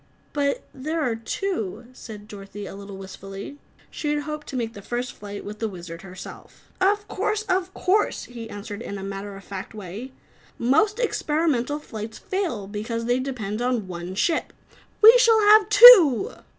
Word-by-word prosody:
"But 280 -1 0
there 310 +5 -3
are 240 -5 0
two," 230 - -4
said 210 -4 -11
Dorothy 205 -1 -9
a - - -8
little 200 0 -9
wistfully. 195 +7 -9 0.3
She 300 - -4
had 295 0 -1
hoped 300 0 -6
to - - -7
make 230 -2 -2
the 200 - -10
first 245 +4 -4
flight 205 0 -9
with 210 +1 -8
the 225 - -1
Wizard, 170 -4 -9
herself. 185 -1 -12
"Of 410 +2 +2
course, 425 0 -1
of 375 -3 -1
course!" 410 +3 +1
he 235 -2 -9
answered 205 +1 -7
in 200 - -6
a 195 - -7
matter 195 0 -6
of 195 - -13
fact 195 +2 -8
way. 210 +6 -8 0.5
"Most 320 - +2
experimental 300 - 0
flights 220 -6 -8
fail 350 - -3
because 220 +3 -4
they 245 +1 +1
depend 235 -5 -4
on 245 -5 -1
one 175 +1 -6
ship. 325 - 0 0.5
We 450 +3 +11
shall 455 -2 +5
have 420 0 +6
two!" 415 - +9
235 Hz, 170 wpm, -24 LUFS, 200-320 Hz, 0.5 s, We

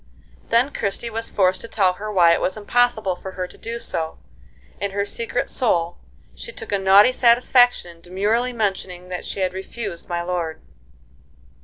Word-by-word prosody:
Then 240 +5 +3
Christie 215 +4 -1
was 225 +1 -2
forced 185 -2 +1
to - - -8
tell 190 -5 +2
her 210 +4 -6
why 175 -4 +5
it - - 0
was 190 - 0
impossible 220 -3 +1
for 190 +1 -8
her 185 -1 -4
to - - -17
do 230 +1 -6
so; 160 -8 -4 0.6
and, 200 -1 -1
in 195 - -8
her 200 - +1
secret 230 +3 -2
soul, 175 -9 0 0.3
she - - -8
took - - -8
a 200 - +1
naughty 195 +5 +6
satisfaction 245 -6 +3
in - - -24
demurely 210 +8 0
mentioning 190 -5 -3
that 180 -1 -5
she 195 - -4
had 185 -1 0
refused 190 -1 -6
my 170 0 -2
lord. 170 -3 -3
200 Hz, 180 wpm, -22 LUFS, 180-230 Hz, 0.6 s, naughty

